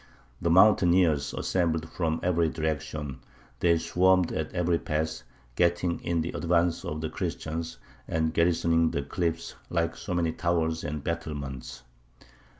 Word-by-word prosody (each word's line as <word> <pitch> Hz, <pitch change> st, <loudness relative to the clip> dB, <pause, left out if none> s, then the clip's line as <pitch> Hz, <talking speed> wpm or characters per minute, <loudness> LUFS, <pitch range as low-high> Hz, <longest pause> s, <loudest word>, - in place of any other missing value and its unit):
The 85 Hz, -, +1 dB
mountaineers 90 Hz, -6 st, +5 dB
assembled 80 Hz, -3 st, 0 dB
from 80 Hz, -2 st, -1 dB
every 85 Hz, -2 st, +2 dB
direction: 75 Hz, -3 st, -3 dB, 0.4 s
they 85 Hz, -1 st, +4 dB
swarmed 90 Hz, +2 st, +3 dB
at 80 Hz, 0 st, -3 dB
every 85 Hz, -1 st, +1 dB
pass, 80 Hz, -2 st, -2 dB, 0.3 s
getting 85 Hz, 0 st, +1 dB
in 85 Hz, -1 st, -1 dB
the 85 Hz, -, -3 dB
advance 85 Hz, 0 st, +1 dB
of 75 Hz, +1 st, -4 dB
the 80 Hz, -, -2 dB
Christians, 80 Hz, +1 st, -4 dB, 0.3 s
and 80 Hz, 0 st, 0 dB
garrisoning 85 Hz, -1 st, +3 dB
the 70 Hz, -, -2 dB
cliffs, 80 Hz, +2 st, -2 dB, 0.2 s
like 85 Hz, 0 st, 0 dB
so 90 Hz, -, -4 dB
many 85 Hz, -2 st, +1 dB
towers 80 Hz, -1 st, 0 dB
and 75 Hz, -2 st, -4 dB
battlements. 70 Hz, -7 st, -5 dB
85 Hz, 135 wpm, -28 LUFS, 80-85 Hz, 0.4 s, mountaineers